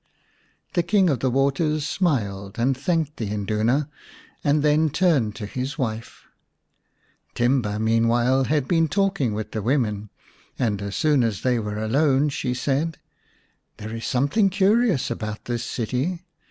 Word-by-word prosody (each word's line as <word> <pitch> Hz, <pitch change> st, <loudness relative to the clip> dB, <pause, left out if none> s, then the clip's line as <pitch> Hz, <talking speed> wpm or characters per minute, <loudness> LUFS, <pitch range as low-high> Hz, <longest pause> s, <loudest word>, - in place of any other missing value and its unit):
The 175 Hz, -, +2 dB
King 185 Hz, 0 st, +3 dB
of 130 Hz, -, -1 dB
the 130 Hz, -, +1 dB
Waters 140 Hz, +3 st, +1 dB
smiled 100 Hz, -, -1 dB
and 130 Hz, +3 st, +2 dB
thanked 155 Hz, +2 st, -1 dB
the 110 Hz, -4 st, -3 dB
Induna, 110 Hz, +7 st, 0 dB, 0.6 s
and 145 Hz, 0 st, +2 dB
then 155 Hz, +1 st, +3 dB
turned 145 Hz, -, +1 dB
to 105 Hz, -, -6 dB
his 130 Hz, +7 st, -4 dB
wife. 115 Hz, -5 st, -4 dB, 1.1 s
Timba 120 Hz, -4 st, +1 dB
meanwhile 115 Hz, +4 st, +2 dB
had 145 Hz, -1 st, 0 dB
been 165 Hz, -2 st, +2 dB
talking 190 Hz, -, 0 dB
with 110 Hz, 0 st, -5 dB
the 110 Hz, -, -3 dB
women, 105 Hz, -4 st, 0 dB, 0.5 s
and 105 Hz, -5 st, -1 dB
as 100 Hz, 0 st, -4 dB
soon 150 Hz, -5 st, +3 dB
as 110 Hz, -5 st, -1 dB
they 125 Hz, -2 st, +2 dB
were 105 Hz, -1 st, -4 dB
alone 135 Hz, +6 st, +2 dB
she 125 Hz, -2 st, -2 dB
said: 145 Hz, +6 st, -1 dB, 0.4 s
" -, -, -42 dB
There 110 Hz, 0 st, -7 dB
is 115 Hz, -, -5 dB
something 145 Hz, -, +2 dB
curious 195 Hz, -, +2 dB
about 110 Hz, -2 st, -5 dB
this 120 Hz, -1 st, -2 dB
city. 130 Hz, -, -2 dB
130 Hz, 150 wpm, -23 LUFS, 110-155 Hz, 1.1 s, King